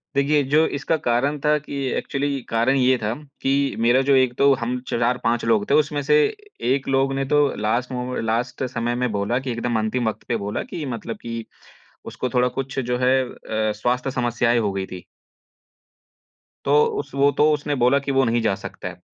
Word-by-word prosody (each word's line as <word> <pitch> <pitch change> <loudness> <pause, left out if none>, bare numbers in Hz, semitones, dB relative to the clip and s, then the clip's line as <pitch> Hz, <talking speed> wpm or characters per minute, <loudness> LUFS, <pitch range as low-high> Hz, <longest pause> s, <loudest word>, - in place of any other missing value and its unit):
देखिए 145 +1 +3
जो 150 +4 +3
इसका 160 +3 0
कारण 135 +5 +1
था 150 0 +4
कि 145 - -8 0.2
एक्चुअली 140 -1 -2
कारण 115 +4 +2
ये 130 0 +3
था 105 - 0 0.3
कि 140 +1 +1
मेरा 120 +3 +4
जो 135 - +6
एक 130 -2 +3
तो 140 0 +5
हम 125 +1 -3
4-5 120 -1 0
लोग 110 -3 +2
थे 140 - +3
उसमें 145 -1 +2
से 150 +2 +3 0.6
1 135 -1 -2
लोग 135 0 +2
ने 135 0 -1
तो 145 +2 +2 0.2
लास्ट 120 +4 0
मोमें 125 -1 -3
लास्ट 115 +4 -2
समय 120 -1 -2
में 125 -2 -1
बोला 105 +5 0
कि 135 -1 -4
एकदम 120 -1 -1
अंतिम 110 +2 -1
वक़्त - - -8
पे 120 - 0
बोला 105 - -2
कि 160 - -5
मतलब 115 0 -6
कि 115 -1 -5 0.6
उसको 125 - -3
थोड़ा 125 -1 +2
कुछ 135 0 -3
जो 125 -1 -1
है 130 +1 +3
अ, 110 -2 -2
स्वास्थ्य 125 +4 -1
समस्याएँ 120 -1 +1
हो 105 -3 0
गयी 95 -1 -2
थी। 90 -1 -9 1.6
तो 450 0 +5 0.2
उस - - -6
वो 140 +1 +4
तो 150 +1 +5
उसने 145 0 -2
बोला 125 +2 +3
कि 140 0 -3
वो 135 0 +3
नहीं 120 0 +1
जा 110 -3 +1
सकता 95 - -8
है। - - -12
125 Hz, 200 wpm, -22 LUFS, 115-140 Hz, 1.6 s, जो